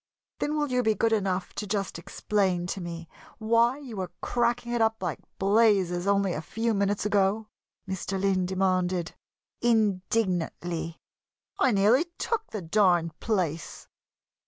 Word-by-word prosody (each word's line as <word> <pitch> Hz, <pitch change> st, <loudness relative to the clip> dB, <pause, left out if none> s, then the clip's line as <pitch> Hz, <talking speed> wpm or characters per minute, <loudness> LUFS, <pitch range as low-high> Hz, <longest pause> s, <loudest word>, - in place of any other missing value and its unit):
"Then 300 Hz, +1 st, -1 dB
will 295 Hz, -3 st, -1 dB
you 250 Hz, 0 st, +2 dB
be 220 Hz, -2 st, +2 dB
good 225 Hz, +3 st, +2 dB
enough 190 Hz, -3 st, -1 dB
to 210 Hz, -, -5 dB
just 195 Hz, -4 st, -2 dB
explain 185 Hz, -1 st, 0 dB
to 195 Hz, -, -7 dB
me 170 Hz, -1 st, -6 dB, 0.3 s
why 230 Hz, +3 st, +3 dB
you 260 Hz, -7 st, -9 dB
were 185 Hz, -2 st, -3 dB
cracking 240 Hz, 0 st, 0 dB
it 240 Hz, -1 st, 0 dB
up 220 Hz, -2 st, +1 dB
like 175 Hz, -4 st, -2 dB, 0.2 s
blazes 195 Hz, -3 st, +3 dB
only 200 Hz, -2 st, +2 dB
a 155 Hz, -, -3 dB
few 225 Hz, +7 st, -1 dB
minutes 200 Hz, 0 st, 0 dB
ago?" 210 Hz, +1 st, +1 dB, 0.4 s
Mr. 190 Hz, +1 st, -3 dB
Lynn 190 Hz, -2 st, +1 dB
demanded, 185 Hz, -2 st, 0 dB, 0.5 s
indignantly. 185 Hz, -6 st, 0 dB, 0.6 s
"I -, -, +4 dB
nearly 220 Hz, -, +4 dB
took 450 Hz, -1 st, -2 dB
the 210 Hz, -4 st, -5 dB
darned 170 Hz, -3 st, +2 dB
place!" 175 Hz, -8 st, -2 dB
200 Hz, 140 wpm, -27 LUFS, 180-225 Hz, 0.6 s, I